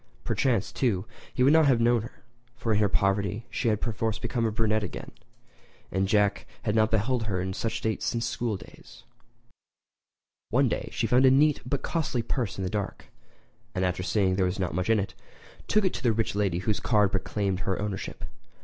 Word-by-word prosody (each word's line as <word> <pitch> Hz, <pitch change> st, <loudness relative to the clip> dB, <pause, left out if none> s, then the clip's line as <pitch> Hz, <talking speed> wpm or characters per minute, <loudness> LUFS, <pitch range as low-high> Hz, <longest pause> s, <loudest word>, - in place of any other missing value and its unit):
Perchance, 115 Hz, -7 st, 0 dB
too, 105 Hz, -7 st, 0 dB, 0.3 s
he 125 Hz, -, +1 dB
would 140 Hz, +3 st, +6 dB
not 160 Hz, -2 st, +6 dB
have 130 Hz, -4 st, +4 dB
known 120 Hz, 0 st, +3 dB
her; 115 Hz, -, -11 dB, 0.3 s
for 115 Hz, -1 st, -1 dB
in 105 Hz, -, +2 dB
her 105 Hz, -2 st, +3 dB
poverty 100 Hz, +3 st, 0 dB
she 125 Hz, -, -1 dB
had 105 Hz, -2 st, +2 dB
perforce 115 Hz, -2 st, -1 dB
become 115 Hz, 0 st, -1 dB
a -, -, -1 dB
brunette 110 Hz, 0 st, +1 dB
again, -, -, -6 dB, 0.8 s
and 95 Hz, +1 st, +1 dB
Jack 100 Hz, 0 st, +2 dB, 0.2 s
had 105 Hz, -4 st, 0 dB
not 110 Hz, 0 st, +3 dB
beheld 110 Hz, +2 st, +1 dB
her 95 Hz, -4 st, -1 dB
in 95 Hz, +1 st, -2 dB
that 115 Hz, +4 st, -2 dB
state 110 Hz, -1 st, -2 dB
since 115 Hz, -1 st, -1 dB
school 115 Hz, -4 st, -2 dB
days. -, -, -15 dB, 1.5 s
One -, -, +3 dB
day -, -, -2 dB
she -, -, -1 dB
found 130 Hz, +2 st, +5 dB
a -, -, +8 dB
neat 145 Hz, +3 st, +4 dB
but 140 Hz, +1 st, -2 dB
costly 140 Hz, -8 st, -1 dB
purse 115 Hz, -3 st, -2 dB
in 95 Hz, -, -3 dB
the -, -, -1 dB
dark; 105 Hz, -2 st, -4 dB, 0.6 s
and 95 Hz, -, +1 dB
after 90 Hz, 0 st, -1 dB
seeing 95 Hz, +2 st, +1 dB
that -, -, +1 dB
there 95 Hz, -, +3 dB
was 90 Hz, -, -2 dB
not 90 Hz, -5 st, -2 dB
much 90 Hz, +4 st, -1 dB
in 110 Hz, -1 st, +4 dB
it, 100 Hz, -, -3 dB, 0.5 s
took 210 Hz, -1 st, +3 dB
it 185 Hz, -, +1 dB
to -, -, -5 dB
the 120 Hz, -3 st, +2 dB
rich 115 Hz, +1 st, -1 dB
lady 100 Hz, -4 st, 0 dB
whose 100 Hz, +3 st, -1 dB
card 105 Hz, -4 st, +3 dB
proclaimed 95 Hz, 0 st, -1 dB
her 95 Hz, -2 st, -1 dB
ownership. 100 Hz, -2 st, -4 dB
110 Hz, 205 wpm, -27 LUFS, 100-120 Hz, 1.5 s, a